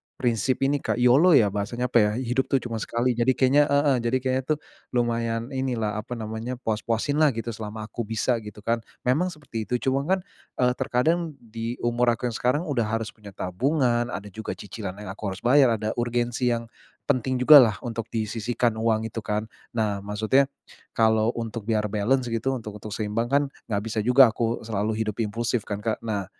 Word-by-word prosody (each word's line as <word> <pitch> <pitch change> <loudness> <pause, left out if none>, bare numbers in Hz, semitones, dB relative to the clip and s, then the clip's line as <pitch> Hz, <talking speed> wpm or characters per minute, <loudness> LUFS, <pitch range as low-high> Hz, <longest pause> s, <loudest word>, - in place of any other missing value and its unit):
prinsip 125 +1 0
ini, 140 +1 +2
Kak, - - -1
YOLO 135 +8 +5
ya, 105 -6 +5
bahasanya, 120 +5 -2
apa 120 - +5
ya, 105 0 +3
hidup 130 +1 -1
tuh - - +1
cuma 115 -2 -4
sekali. 120 +3 0
Jadi, 120 +2 +2
kayaknya 140 +3 +4
heeh, 140 -1 +3
jadi 120 +2 +1
kayanya 130 0 0
tuh, - - -13 0.4
lumayan 115 -1 0
inilah, 120 -6 -1
apa 120 +3 -6
namanya, 110 +3 -4
puas-puasinlah, 125 +7 +1
gitu, 115 0 -3
selama 110 0 -6
aku 115 +3 -4
bisa, 115 +2 +1
gitu 105 0 -10
kan, 115 +1 +1 0.2
memang 150 +9 +2
seperti 145 -8 -6
itu. 125 - 0
Cuma 135 +1 +2
kan, 190 0 +2 0.4
eee, 125 0 +4
terkadang 160 +6 0
di 115 +1 -5
umur 120 0 +2
aku 125 - -3
yang - - -7
sekarang, 135 +7 +1
udah 125 -6 +1
harus 110 +1 -2
punya 105 -2 -12
tabungan, 120 - +1
ada 100 +1 -5
juga 110 +2 -5
cicilan 100 -1 -7
yang 105 -2 -6
aku 105 - -12
harus 95 - -14
bayar, 130 -1 +5
ada 110 0 -2
urgensi 120 +1 0
yang 115 -1 +1 0.4
penting 130 -1 0
jugalah, 125 -4 +8
untuk 115 -2 -4
disisihkan, 115 +1 -1
uang 110 -1 +1
itu 115 - -4
kan. 105 +1 -2 0.3
Nah, 105 -3 0
maksudnya 110 +7 +2 0.5
kalau 110 -1 +3
untuk 115 -2 -5
biar 105 -2 0
balance, 120 +4 +1
gitu, 130 +4 0
untuk 105 -3 -7
untuk 105 -1 -6
seimbang 110 +2 -1
kan, 140 +2 +3 0.2
nggak 100 -2 -1
bisa 110 -1 -2
juga 125 +2 +6
aku 115 +1 -2
selalu 110 0 -1
hidup 105 +1 -4
impulsif 115 +1 -1
kan, 105 0 -4
Kak. 110 -2 -1
Nah, 105 -4 -2
115 Hz, 190 wpm, -25 LUFS, 110-125 Hz, 0.5 s, jugalah